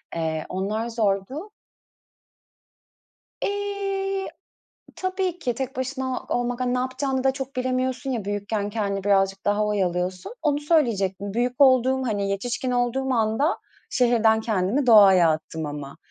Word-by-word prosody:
eee, 160 -1 -2
onlar 210 +5 -2
zordu. 225 - -1 1.9
Eee, 390 -1 -2 0.7
tabii 370 -1 -2
ki 250 -8 -2
tek 265 +1 -4
başına 260 0 -3
olmak, 245 0 -1
hani, 250 0 0
ne - - +1
yapacağını 260 +1 -2
da 265 - +4
çok 270 0 -6
bilemiyorsun 255 +1 -1
ya, 235 -6 -2
büyükken 205 +1 -2
kendini 200 -2 -2
birazcık 195 -1 +2
daha 205 +1 +2
oyalıyorsun. 185 - -1
Onu 290 -2 +1
söyleyecektim. 205 - +1
Büyük 245 +2 -1
olduğum, 260 -1 +5
hani, 200 -3 -1
yetişkin 245 +5 -2
olduğum 245 +2 0
anda 230 - +1 0.3
şehirden 230 -3 +3
kendimi 220 +5 0
doğaya 195 -7 +7
attım 155 0 -3
ama. 145 -1 -7
240 Hz, 125 wpm, -24 LUFS, 200-265 Hz, 1.9 s, doğaya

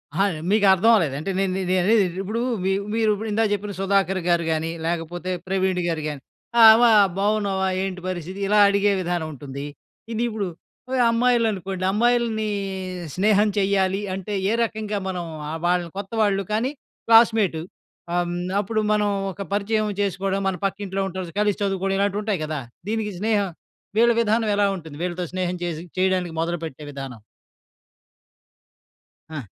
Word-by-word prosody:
అహా! 195 +3 +3 0.2
మీకు 205 0 +3
అర్థం 190 +4 +4
అవ్వలేదు. 165 -11 +2
అంటే 175 +6 -3
నే 195 - +2 0.3
నే 185 - +3
అనేది 215 +3 +4
ఏంటి, 175 0 -8
ఇప్పుడు 215 +4 -3 0.2
మీ 190 - +1 0.2
మీరు 220 -1 +3 0.2
ఇందాక 220 +1 +2
చెప్పిన 205 0 -3
సుధాకర్‌గారు 190 -3 +1
గాని, 160 +1 -1 0.2
లేకపోతే 170 +2 -3 0.2
ప్రవీణ్‌గారు 185 -3 0
గాని, 145 -2 -5 0.4
ఆహ్, 220 -1 +10
వా 240 - +6 0.3
బాగున్నావా? 200 -2 +1 0.2
ఏంటి 185 -1 -4
పరిస్థితి? 185 +1 -5
ఇలా 210 +1 +4
అడిగే 200 0 +3
విధానం 175 -2 -2
ఉంటుంది. 140 0 -7 0.5
ఇది 225 +1 -1
ఇప్పుడు 215 -3 -3 0.5
ఆహ్, 260 - +2
అమ్మాయిలు 235 0 +3
అనుకోండి, 190 -1 -5
అమ్మాయిల్ని 230 0 +1 0.7
స్నేహం 210 +2 +3
చేయ్యలి 195 -1 +1
అంటే, 195 +2 -5 0.2
ఏ - - +2
రకంగా 215 -2 -3
మనం 180 -2 -3 0.3
ఆహ్, 160 +1 -4
వాళ్ళని 175 -1 +1
కొత్తవాళ్ళు 200 -1 0
కానీ, 235 +5 0 0.4
క్లాస్‌మేటు 225 -7 +5 0.5
ఆహ్, 175 0 +1
హ్మ్, 175 - -3 0.2
అప్పుడు 215 +2 -2
మనం 210 -1 +2 0.2
ఒక 190 - -9
పరిచయం 215 +1 0
చేసుకోవడం, 195 0 -1
మన 190 - -2
పక్కింట్లో 195 0 -3
ఉంటారు, 185 -2 -6
కలిసి 205 -1 +1
చదువుకోవడం, 195 0 0
ఇలాంటివుంటాయి 205 -2 0
కదా! 155 -2 -3 0.3
దీనికి 215 -2 -2
స్నేహం, 205 -2 +1 0.5
వీళ్ళ 235 +1 +5
విధానం 220 0 +1
ఎలా 205 - +4
ఉంటుంది? 160 -4 -10
వీళ్ళతో 180 0 -2
స్నేహం 180 -1 -1
చేసి 165 -2 -4 0.2
చేయడానికి 185 -2 +1
మొదలుపెట్టే 165 -3 -4
విధానం. 135 -4 -7 2.1
ఆ! 155 -4 -5
195 Hz, 145 wpm, -23 LUFS, 175-210 Hz, 2.1 s, ఆహ్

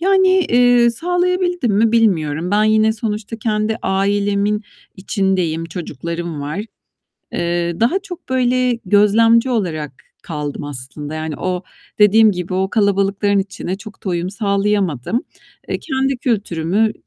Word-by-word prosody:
Yani, 380 +1 +4
eee, 245 -10 +4
sağlayabildim 355 - 0
mi 225 +1 +3
bilmiyorum. 175 -7 +1
Ben 210 +1 +3
yine 215 0 +3
sonuçta 215 0 -3
kendi 215 0 -1
ailemin 200 +2 0 0.3
içindeyim, 190 -5 -1
çocuklarım 170 -1 -5
var. 150 +7 -4 0.7
Eee, 170 0 -1
daha 240 +12 +3
çok, 365 -3 -10
böyle, 255 -1 +1
gözlemci 225 +5 +4
olarak 165 - -2 0.3
kaldım 150 -3 -5
aslında. 145 +2 -6
Yani 155 -1 -4
o, 180 -1 -2 0.4
dediğim 215 +1 +6
gibi 180 0 -4
o 190 +1 0
kalabalıkların 200 -1 +1
içine 190 -1 -3
çok 210 0 -12
da - - -2
uyum 175 0 -1
sağlayamadım. 200 - 0 0.4
Eee, - - -2
kendi 270 -2 -1
kültürümü, 210 -3 0
205 Hz, 125 wpm, -18 LUFS, 175-230 Hz, 0.7 s, dediğim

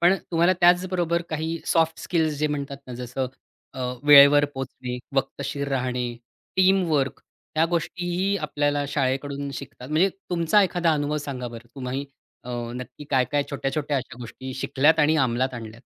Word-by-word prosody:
पण 175 +2 +5 0.2
तुम्हाला 170 +2 +4
त्याचबरोबर 175 -1 +3
काही 160 +1 -2
सॉफ्ट 165 -1 +2
स्किल्स 160 -3 0
जे 150 - +2
म्हणतात 140 -1 -3
ना, 125 - -7
जसं 125 +2 -3 0.5
अ, 130 - -6 0.2
वेळेवर 145 0 +8
पोहोचणे, 130 -2 -5 0.2
वक्तशीर 140 +1 -2
राहणे, 125 -2 -1 0.5
टीमवर्क, 180 -8 +2 0.4
ह्या 160 - +5
गोष्टीही 175 +3 -1
आपल्याला 145 -1 0
शाळेकडून 140 0 -1
शिकतात. 130 -1 -9
म्हणजे 160 +6 +3 0.2
तुमचा 175 +4 +4
एखादा 175 -2 +2
अनुभव 145 0 -1
सांगा 125 -3 -4
बरं. 115 0 -10
तुम्ही 135 +1 -4 0.4
अ, - - -5 0.2
नक्की 125 +3 -8
काय-काय, 135 +1 +2
छोट्या-छोट्या 145 +1 -1
अशा 125 -2 -5
गोष्टी 130 +2 -7
शिकल्यात 145 +4 +2
आणि 150 +2 +4
अंमलात 130 -1 +1
आणल्यात? 115 -1 -8
145 Hz, 145 wpm, -24 LUFS, 130-165 Hz, 0.5 s, वेळेवर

